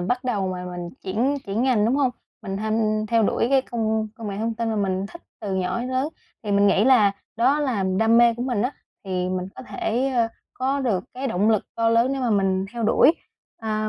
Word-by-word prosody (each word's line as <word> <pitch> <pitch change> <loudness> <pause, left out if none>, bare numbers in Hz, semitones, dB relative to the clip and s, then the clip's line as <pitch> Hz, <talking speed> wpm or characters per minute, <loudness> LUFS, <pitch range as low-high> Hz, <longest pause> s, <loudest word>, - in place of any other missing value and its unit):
bắt 245 +8 -1
đầu 205 -7 0
mà 180 -1 -4
mình 175 -1 -6
chuyển 235 +9 0
chuyển 200 +4 -1
ngành, 250 -5 +3
đúng 245 +4 +2
hông? 275 -3 +2 0.3
Mình 195 -1 -4
h 215 - -4 0.4
theo 230 0 +3
đuổi 220 - +1
cái 270 -1 +4
công 220 -3 -1
công 225 -2 -7
nghệ 195 - -4
thông 225 +1 -1
tin 230 0 -2
mà 220 - -1
mình 195 -1 -1
thích 340 +11 -13 0.2
từ 200 -3 -3
nhỏ 185 +3 -1
đến 250 - -4
lớn 260 +3 0 0.3
thì 210 -2 -2
mình 200 0 +4
nghĩ 200 +1 +4
là 230 -6 +5 0.2
đó 260 +6 +3
là 250 -9 0
đam 225 +1 +4
mê 235 -1 +5
của 240 - -4
mình 245 -5 0
á, 250 +4 -1 0.3
thì 185 -1 -2
mình 185 0 -3
có - - -9
thể, 250 +1 -1
ơ, 230 -2 +2 0.3
có 270 +2 -1
được 215 -9 0
cái 260 +2 -3
động 210 -2 +2
lực 215 -3 +2
to 230 0 +1
lớn 230 +3 +3
nếu 270 - -2
mà 245 - +1
mình 190 -2 +1
theo 235 -1 -4
đuổi. 230 +7 +5 0.5
À, 215 -1 -2
225 Hz, 240 wpm, -23 LUFS, 200-250 Hz, 0.5 s, là